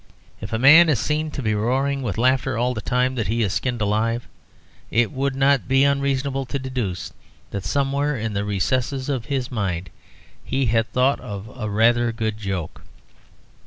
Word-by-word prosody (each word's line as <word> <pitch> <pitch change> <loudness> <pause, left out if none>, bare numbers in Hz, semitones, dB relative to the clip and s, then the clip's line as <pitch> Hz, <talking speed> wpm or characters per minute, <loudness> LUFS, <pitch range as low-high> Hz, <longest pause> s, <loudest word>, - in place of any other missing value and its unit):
If 105 - -6
a 110 - 0
man 160 +7 +8
is 145 - +3
seen 155 +4 -1
to 140 -2 -5
be 110 -1 +1
roaring 135 +6 0
with 115 -6 -3
laughter 130 0 +2
all 125 +2 +1
the 110 - -5
time 125 +3 +1
that 115 -7 -2
he 115 +3 +1
is 100 -2 -1
skinned 120 +2 -2
alive, 110 +3 0 0.6
it 115 -1 +2
would 135 0 -1
not 135 0 +2
be 135 +1 +4
unreasonable 140 -1 0
to 140 - -2
deduce 125 -9 -4 0.4
that 100 -2 -4
somewhere 140 +5 0
in 110 -1 -3
the 100 0 -1
recesses 130 +7 -1
of 130 -5 -2
his 130 -1 -2
mind 95 -7 -3 0.5
he 135 0 -1
had 115 -1 +1
thought 130 +2 +2
of 100 +2 -8
a 110 -4 -4
rather 120 +3 +3
good 110 -2 -3
joke. 95 -6 -4
125 Hz, 180 wpm, -22 LUFS, 110-135 Hz, 0.6 s, man